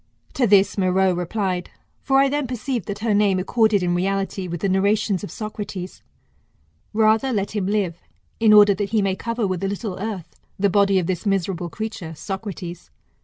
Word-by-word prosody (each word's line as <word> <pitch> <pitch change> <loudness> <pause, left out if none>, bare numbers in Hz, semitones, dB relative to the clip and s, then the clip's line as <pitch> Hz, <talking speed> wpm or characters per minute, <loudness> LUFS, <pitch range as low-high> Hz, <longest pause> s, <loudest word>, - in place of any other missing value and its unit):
To 245 - +2
this 200 0 +4
Meroe 185 0 +3
replied; 180 +1 -2 0.3
for 270 -1 +1
I 275 0 +5
then 290 -1 -1
perceived 245 -3 -3
that 205 +1 -5
her 220 - +2
name 205 -2 +3
accorded 215 +1 +2
in 175 0 +1
reality 195 +1 -1
with 175 -1 -5
the - - +1
narrations 200 0 +1
of 205 - -5
Socrates: 205 -4 -6 0.9
Rather 220 +4 +3
let 200 -4 -1
him 205 -3 -2
live, 195 -5 -1 0.4
in 220 -1 +5
order 205 -1 +8
that 200 0 -3
he 215 -2 +1
may 195 -1 0
cover 230 +1 -2
with 185 -1 -2
a - - +1
little 200 -1 -4
earth 200 -5 -6 0.2
the 200 0 +2
body 200 -1 +3
of 180 - +1
this 185 +3 -2
miserable 185 -3 -1
creature 210 -6 -6
[Socrates. 180 -1 -6
200 Hz, 180 wpm, -22 LUFS, 185-215 Hz, 0.9 s, order